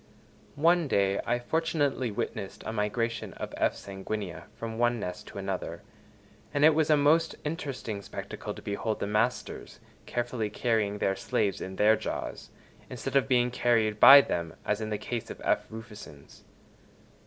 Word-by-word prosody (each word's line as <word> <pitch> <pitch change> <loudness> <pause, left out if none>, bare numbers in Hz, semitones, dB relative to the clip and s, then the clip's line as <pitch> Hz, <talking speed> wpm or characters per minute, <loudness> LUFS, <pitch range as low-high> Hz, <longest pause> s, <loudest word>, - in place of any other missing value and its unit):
One 165 +2 +3
day 100 -5 +2
I 120 - +2
fortunately 145 -1 0
witnessed 100 -1 -5
a 110 - -3
migration 115 +2 -2
of - - -7
F. - - +1
sanguinea 95 -3 -6
from 115 0 -6
one 120 0 +2
nest 90 -3 -6
to - - -10
another, 95 -1 -4 0.7
and 145 +1 +3
it 160 - +7
was 155 0 +2
a 150 - +6
most 160 +3 +3
interesting 140 -9 -4
spectacle - - -7
to - - -11
behold 105 +2 -2
the - - -1
masters 105 +4 -2 0.3
carefully 120 -2 -2
carrying 110 -2 0
their 95 -1 +1
slaves 100 0 -1
in 95 0 -5
their 105 +3 +5
jaws - - -5 0.4
instead - - -5
of 135 -1 +4
being 125 -2 +3
carried 115 -4 +1
by 140 +4 +11
them, 85 -9 -3
as 105 +1 0
in 110 - -3
the 105 - -1
case 120 +2 -5
of - - -8
F. - - +1
rufescens. 105 -11 -11
115 Hz, 160 wpm, -29 LUFS, 100-130 Hz, 0.7 s, by